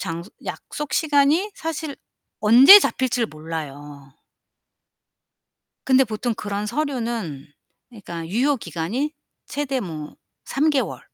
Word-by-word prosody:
장소 170 +4 -5
약속 295 -1 -6
시간이 310 +6 +2
사실 315 -2 -5 0.5
언제 255 - +9
잡힐지를 245 - 0
몰라요. 145 -3 -8 1.7
근데 265 0 +5
보통 225 +2 -3
그런 205 -1 -4
서류는 230 - -3 0.5
그러니까 170 -7 -8
유효 255 - +1
기간이 205 - -3 0.3
최대 275 -2 -2
뭐 155 -6 -7 0.3
3 295 +3 +1
개월 285 -3 -1
230 Hz, 220 characters per minute, -22 LUFS, -, 1.7 s, 언제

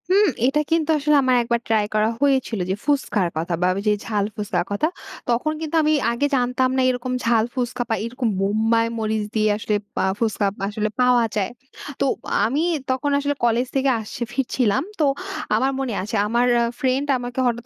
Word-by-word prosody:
হুম, 400 +3 +5 0.2
এটা 275 +4 +2
কিন্তু 325 -1 +1
আসলে 300 +1 +2
আমার 255 -1 +3
১ 235 - -5
বার 235 - +1
ট্রাই 220 -2 +2
করা 215 +1 +3
হয়েছিল, 265 -6 +1
যে 190 - +1
ফুস্কার 270 -10 +1
কথা 170 +2 -2
বা 180 - +3
ওই - - -2
যে 210 - +5
ঝাল 210 -3 0
ফুস্কার 210 -4 -1
কথা। 205 +10 +1 0.4
তখন 245 +6 +1
কিন্তু 320 0 -3
আমি 305 0 +3 0.2
আগে 235 +5 0
জানতাম 250 0 +1
না - - +3
এরকম 255 0 -2
ঝাল 230 -1 +3
ফুসকা 245 -1 -2
বা 225 - +2
এরকম 240 0 -2
বোম্বাই 220 +3 +2
মরিচ 220 -1 -1
দিয়ে 215 -1 +3
আসলে 210 0 -1 0.2
পা - - 0 0.2
ফুসকা 220 -2 0 0.2
আসলে 215 +1 -2
পাওয়া 250 -2 +4
যায়। 205 -1 0 0.5
তো - - +3 0.4
আমি 270 +7 0 0.3
তখন 260 +2 0
আসলে 285 0 -1
কলেজ 235 +2 +2
থেকে 270 0 +2
আসছি, 220 +2 -8
ফিরছিলাম। 255 -2 +1 0.2
তো 305 - +4 0.5
আমার 265 +1 +2
মনে 260 -4 -2
আছে, 215 +3 -4
আমার 235 +3 +2 0.2
আ - - +3 0.2
ফ্রেন্ড 265 +2 +1
আমাকে 245 +1 -5
হঠাৎ 235 -1 -2
240 Hz, 190 wpm, -22 LUFS, 220-270 Hz, 0.5 s, হুম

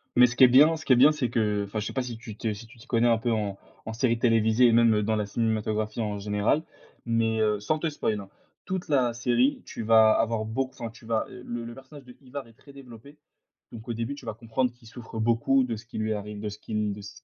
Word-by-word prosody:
Mais 125 0 +7
ce 120 - -6
qui 130 - +5
est - - +10
bien 145 +6 +6
ce 160 - -9
qui 130 - +5
est - - +6
bien, 135 +5 +7
c'est 145 -5 -2
que, 105 -3 0
enfin, 100 +2 -4
je 105 - -4
sais - - -6
pas 130 - 0
si 120 -2 -6
tu 110 -2 -9
te 110 - -2
si 105 +3 -11
tu 125 +2 -18
t'y 115 +4 -16
connais 120 0 +2
un 115 -1 +4
peu 115 +1 -1
en 105 -3 -2 0.3
en 110 - -5
séries 115 0 +1
télévisées 115 0 +4
et - - +4
même, 115 -1 +5
heu, 105 - +1
dans 110 +1 0
la 105 -1 -1
cinématographie 110 0 -1
en 105 -2 -3
général, 105 +8 0 0.4
mais 115 -1 +1
heu, 105 -1 +1
sans 155 +10 -1
te 165 - -1
spoil, 110 -8 -2
hein, 100 -1 -10 0.4
toute 185 -1 -4
la 130 -5 +2
série, 120 +3 +1
tu - - -7
vas 110 0 +6
avoir 115 -1 0
beauc 130 +4 -2
enfin, 115 - -6
tu 115 0 -17
vas, 115 -1 0
heu, 125 - -11
le 120 0 -5
le 120 - -7
personnage 135 +3 -13
de 125 - -14
Ivar 135 0 -8
est 115 - -18
très 140 +5 -18
développé. 135 +1 -13 0.5
Donc 110 0 -10
au 120 - -2
début, 115 +5 -4
tu 140 - -13
vas 110 - -4
comprendre 115 +3 -1
qu'il 120 -2 -19
souffre 115 -1 -9
beaucoup 115 +4 +2
de 120 -2 -3
ce 110 +2 -11
qui 120 - -9
lui 110 0 0
arrive, 105 0 -6
de 105 - -3
ce 105 - -10
qu'il 105 -1 -2
de 105 - -9
s 105 +8 -12
115 Hz, 280 wpm, -26 LUFS, 110-125 Hz, 0.5 s, est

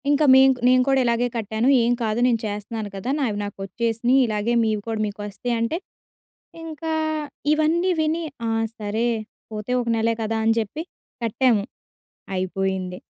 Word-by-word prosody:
ఇంకా 290 +1 +4
మేం 265 0 +7
కు - - -13
నేను 255 0 +5
కూడా 270 -1 +4
ఇలాగే 235 0 +2
కట్టాను. 220 +2 -1
ఏం 235 +1 +2
కాదు 220 +1 0
నేను 235 -2 +2
చేస్తున్నాను 210 +1 -4
కదా! 195 +6 -4
నావి 230 -7 0
నాకొచ్చేసినయి. 230 +5 0
ఇలాగే 215 +1 -1
మీవి 215 -2 0
కూడా 225 -1 -2
మీకొస్తయంటే, 230 +6 -2 0.9
ఇంకా 320 0 -5 0.6
ఇవన్నీ 320 +4 +2
విని, 315 +2 0 0.2
ఆ! - - 0 0.3
సరే 215 +2 -1 0.5
పోతే 215 +3 -4
ఒక 240 - -4
నెలే 230 +1 +1
కదా! 225 +1 -1
అని 225 0 +4
చెప్పి 225 +9 -4 0.4
కట్టాము. 230 -2 +2 0.7
అయిపోయింది. 185 0 -2
230 Hz, 140 wpm, -23 LUFS, 210-255 Hz, 0.9 s, మేం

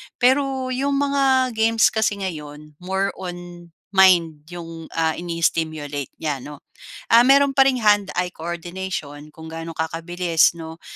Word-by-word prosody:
Pero, 260 0 +1
yung 275 +2 -1
mga 275 -2 +2
games 225 0 +3
kasi 220 -2 0
ngayon, 150 -3 -7
more 190 +2 -2
on 175 -1 -8 0.2
mind 175 -6 +4
yung, 165 -2 -8
ah, 160 -1 0
ini-stimulate 155 -4 -2
niya 150 -3 -1
'no. 145 +2 -11 0.4
Ah, 230 +1 +6
meron 275 +2 +4
pa 270 - +4
ring 255 - -1
hand-eye 205 -5 +1
coordination 170 -3 -6
kung 160 +1 -13
gaano 165 0 -8
kakabilis 165 +1 +1
'no, 160 0 -9
175 Hz, 130 wpm, -21 LUFS, 160-225 Hz, 0.4 s, Ah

